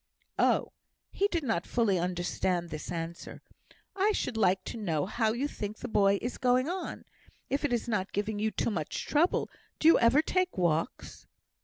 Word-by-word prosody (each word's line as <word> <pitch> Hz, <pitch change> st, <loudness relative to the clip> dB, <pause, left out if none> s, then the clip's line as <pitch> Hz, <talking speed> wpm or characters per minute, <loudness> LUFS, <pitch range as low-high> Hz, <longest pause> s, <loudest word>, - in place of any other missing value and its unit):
"Oh" -, -, +2 dB, 0.4 s
he 400 Hz, -, +1 dB
did 340 Hz, -5 st, -2 dB
not 225 Hz, -9 st, -1 dB
fully 215 Hz, -7 st, +2 dB
understand 175 Hz, 0 st, -1 dB
this 155 Hz, -, -6 dB
answer 170 Hz, 0 st, -6 dB, 0.5 s
"I 400 Hz, +2 st, +2 dB
should 250 Hz, -, -2 dB
like 190 Hz, -3 st, +2 dB
to -, -, -6 dB
know 165 Hz, -9 st, -1 dB
how 220 Hz, +2 st, 0 dB
you 250 Hz, +6 st, -1 dB
think 210 Hz, -6 st, -6 dB
the 250 Hz, -, -6 dB
boy 200 Hz, -3 st, +3 dB
is 245 Hz, -, -4 dB
going 255 Hz, +1 st, +3 dB
on, 365 Hz, +2 st, -4 dB, 0.5 s
if 275 Hz, +2 st, 0 dB
it 290 Hz, -, 0 dB
is 240 Hz, -1 st, 0 dB
not 205 Hz, -4 st, -1 dB
giving 205 Hz, +1 st, -2 dB
you 220 Hz, +1 st, +1 dB
too 215 Hz, +3 st, -1 dB
much 160 Hz, -7 st, -3 dB
trouble; 320 Hz, +4 st, +2 dB, 0.3 s
do 315 Hz, -, +2 dB
you 330 Hz, -, +7 dB
ever 255 Hz, +6 st, +5 dB
take 370 Hz, +2 st, 0 dB
walks?" 165 Hz, -3 st, -1 dB
220 Hz, 180 wpm, -30 LUFS, 180-265 Hz, 0.5 s, you